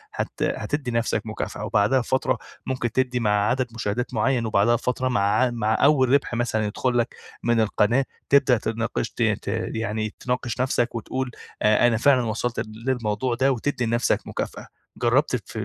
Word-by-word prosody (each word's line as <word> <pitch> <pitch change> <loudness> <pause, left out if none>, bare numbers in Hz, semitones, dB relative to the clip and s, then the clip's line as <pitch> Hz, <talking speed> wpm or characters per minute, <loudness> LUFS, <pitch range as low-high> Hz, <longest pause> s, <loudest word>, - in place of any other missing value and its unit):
هت - - -2
هتدي 145 -4 -2
نفسك 115 -2 0
مكافأة، 110 -1 -4
وبعدها 105 +6 +3
بفترة 130 0 0 0.3
ممكن 125 -3 -2
تدّي 125 0 0
مع 110 -3 +1 0.2
عدد 130 0 0
مشاهدات 115 +3 -2
معيّن، 120 +1 +1
وبعدها 110 +2 +3
بفترة 125 +2 -1
مع 125 -5 +1
ع 105 +6 +3
مع 115 -2 0
أوّل 140 -3 +5
ربح 140 -1 +2
مثلًا 115 -2 0
يدخل 120 +4 -1
لك 120 - 0 0.3
من 120 -1 +2
القناة، 110 +4 +2 0.2
تبدأ 140 -3 +5
تناقش 115 +1 -2
ت - - -7
ت 105 -3 0 0.3
يعني 110 -1 -2
تناقش 125 -1 -2
نفسك 120 -2 0
وتقول 130 +3 -3 0.3
آآ 105 +3 +4
أنا 115 -2 +2
فعلًا 130 +1 +4
وصلت 115 +2 -2
للموضوع 115 +1 -2
ده، 135 +3 +2
وتدّي 125 0 -1
لنفسك 120 +1 0
مكافأة. - - -5 0.3
جرّبت - - +2
الف - - -6
120 Hz, 165 wpm, -24 LUFS, 110-130 Hz, 0.3 s, أوّل